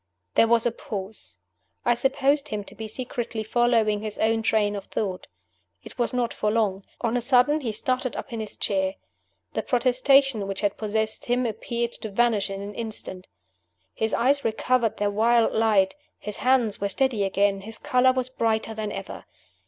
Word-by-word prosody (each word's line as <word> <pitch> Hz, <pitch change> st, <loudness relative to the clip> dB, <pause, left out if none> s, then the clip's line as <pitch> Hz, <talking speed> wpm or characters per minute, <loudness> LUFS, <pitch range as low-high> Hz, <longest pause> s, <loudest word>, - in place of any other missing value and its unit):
There 230 Hz, -, +5 dB
was 230 Hz, 0 st, +3 dB
a 240 Hz, -, +2 dB
pause. 195 Hz, -, -7 dB, 0.5 s
I 240 Hz, -, +5 dB
supposed 275 Hz, +4 st, +1 dB
him 210 Hz, -7 st, -4 dB
to -, -, -14 dB
be 220 Hz, -, -7 dB
secretly 235 Hz, -1 st, -4 dB
following 225 Hz, -2 st, +2 dB
his 215 Hz, -1 st, -5 dB
own 225 Hz, +1 st, +2 dB
train 210 Hz, -2 st, +1 dB
of 200 Hz, -1 st, -6 dB
thought. 190 Hz, -4 st, -3 dB, 0.6 s
It -, -, -12 dB
was 240 Hz, -, +1 dB
not 245 Hz, -2 st, -1 dB
for 210 Hz, -, -1 dB
long. 210 Hz, -3 st, 0 dB, 0.2 s
On 235 Hz, 0 st, 0 dB
a 245 Hz, -, +1 dB
sudden 260 Hz, +5 st, +4 dB
he 235 Hz, -5 st, -2 dB
started 255 Hz, +3 st, -1 dB
up 260 Hz, -, -6 dB
in 230 Hz, -, -3 dB
his 215 Hz, -1 st, -4 dB
chair. 190 Hz, -1 st, 0 dB, 0.6 s
The -, -, -1 dB
prostration 255 Hz, -2 st, +3 dB
which 195 Hz, -1 st, -3 dB
had 205 Hz, -1 st, +1 dB
possessed 220 Hz, 0 st, -2 dB
him 245 Hz, +1 st, +1 dB
appeared 235 Hz, +1 st, -2 dB
to 220 Hz, -, -4 dB
vanish 220 Hz, -1 st, +2 dB
in 195 Hz, 0 st, -5 dB
an 205 Hz, +1 st, -7 dB
instant. 210 Hz, -5 st, -6 dB, 0.7 s
His 220 Hz, 0 st, -1 dB
eyes 275 Hz, +4 st, +2 dB
recovered 225 Hz, +1 st, +1 dB
their 205 Hz, 0 st, 0 dB
wild 230 Hz, +2 st, +3 dB
light; 210 Hz, -4 st, +3 dB, 0.2 s
his 210 Hz, -1 st, -6 dB
hands 250 Hz, -6 st, +2 dB
were 200 Hz, -, 0 dB
steady 245 Hz, -1 st, +1 dB
again; 195 Hz, 0 st, +1 dB
his 220 Hz, +3 st, -7 dB
color 255 Hz, -2 st, +3 dB
was 255 Hz, -1 st, -1 dB
brighter 225 Hz, -3 st, -1 dB
than 215 Hz, -1 st, -4 dB
ever. -, -, -7 dB
225 Hz, 180 wpm, -25 LUFS, 205-245 Hz, 0.7 s, There